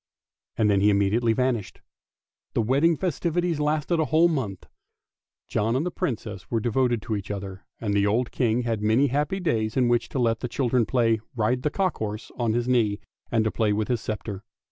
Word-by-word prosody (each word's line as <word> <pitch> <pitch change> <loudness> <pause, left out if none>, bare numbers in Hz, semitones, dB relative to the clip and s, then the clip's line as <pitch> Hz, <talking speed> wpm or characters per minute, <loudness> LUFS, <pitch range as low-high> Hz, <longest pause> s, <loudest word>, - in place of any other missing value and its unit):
" - - -53
And 110 - +3
then 100 -2 +3
he 105 - +5
immediately 105 +4 +2
vanished. 125 -4 -1 0.8
The - - +3
wedding 140 +8 +3
festivities 175 -2 -1
lasted 150 +3 0
a 160 - +2
whole 160 +5 +4
month. 120 - -3 0.8
John 115 +3 0
and 140 +6 0
the 180 - -2
Princess 105 - -4
were 115 - +1
devoted 120 0 +1
to 110 - -2
each 100 -1 -5
other, 100 -1 -6
and 105 -3 -2
the 100 0 +3
old 115 +4 +1
King 120 -1 +1
had 115 -3 -1
many 115 +7 +3
happy 150 +8 0
days 115 - -1
in 125 -2 +3
which 120 -1 +1
to - - -4
let 115 -3 +1
their 125 - -3
little - - -12
children 125 -3 +2
play 115 -3 +2
" - - -36
ride 125 +3 0
a 150 - +2
cock 190 +3 -1
horse 105 0 -5
" - - -25
on 115 -2 +1
his 120 +1 0
knee 110 -5 +2 0.3
and 115 -2 +2
to 110 - 0
play 110 -3 +1
with 105 +2 -1
his 120 -3 0
sceptre. 105 -2 -5
115 Hz, 215 wpm, -25 LUFS, 105-135 Hz, 0.8 s, he